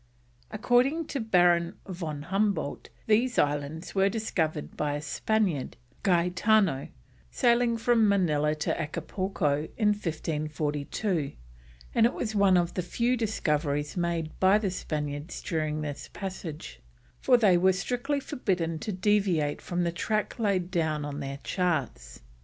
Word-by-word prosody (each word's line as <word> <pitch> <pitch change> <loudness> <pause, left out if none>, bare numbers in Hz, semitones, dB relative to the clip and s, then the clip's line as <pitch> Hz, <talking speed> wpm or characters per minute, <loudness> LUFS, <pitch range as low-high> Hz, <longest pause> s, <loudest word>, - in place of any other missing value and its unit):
According 250 +9 +2
to 275 - -2
Baron 175 -6 +3
von 165 -6 -5
Humboldt 195 -3 -1 0.2
these 235 +3 +2
islands 145 +3 -1
were 195 0 +3
discovered 170 -9 -2
by 145 -1 -1
a - - -2
Spaniard, 175 0 -1 0.2
Gaetano, 180 -3 +2 0.4
sailing 235 - +2
from 230 -2 +3
Manilla 155 -6 +2
to 150 - -1
Acapulco 155 -2 -2
in 215 -3 +3
1542, 155 -2 -2 0.6
and 230 -1 +5
it 240 - -5
was 220 -2 -3
one 200 -3 +4
of 175 0 +1
the 180 - -1
few 235 +7 0
discoveries 150 - -1
made 170 -3 -1
by 190 +2 +5
the 205 -3 -1
Spaniards 150 -2 -4
during 155 -2 -2
this 145 -2 -5
passage, 165 - -7 0.4
for 250 -2 +5
they 205 -6 +5
were 185 +2 +4
strictly 250 +9 -1
forbidden 180 - -2
to 210 - -4
deviate 185 -6 +1
from 175 0 -2
the 170 - 0
track 215 +7 -2
laid 190 -5 0
down 155 -4 0
on 145 0 -5
their 140 -1 -5
charts. 140 - -2
180 Hz, 135 wpm, -28 LUFS, 150-210 Hz, 0.6 s, and